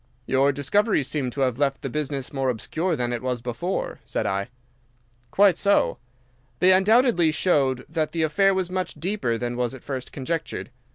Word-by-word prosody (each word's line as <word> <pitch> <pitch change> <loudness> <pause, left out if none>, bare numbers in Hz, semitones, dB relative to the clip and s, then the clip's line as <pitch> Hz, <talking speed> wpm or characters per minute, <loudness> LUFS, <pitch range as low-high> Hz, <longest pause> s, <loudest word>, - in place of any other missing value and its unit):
"Your 135 +2 +3
discoveries 150 - +1
seem 140 -3 -2
to 135 +3 -5
have 130 -1 0
left 140 -1 0
the - - -2
business 140 -1 -3
more 135 -1 0
obscure 155 - -1
that 120 -1 -2
it 120 - -3
was 125 -1 -2
before," 125 +11 -3
said - - -3
I. 100 0 -1 0.8
"Quite 195 +2 +4
so. 200 0 +2 0.6
They 185 +7 +5
undoubtedly 200 -2 +4
showed 135 -7 +1
that 155 0 -2
the 165 -1 -1
affair 195 +6 +3
was 185 -1 -1
much 185 -1 -3
deeper 160 - -1
than 120 +1 -3
was 125 +1 -1
at 130 - -13
first 130 -2 -5
conjectured. 155 0 -4
145 Hz, 175 wpm, -24 LUFS, 130-180 Hz, 0.8 s, They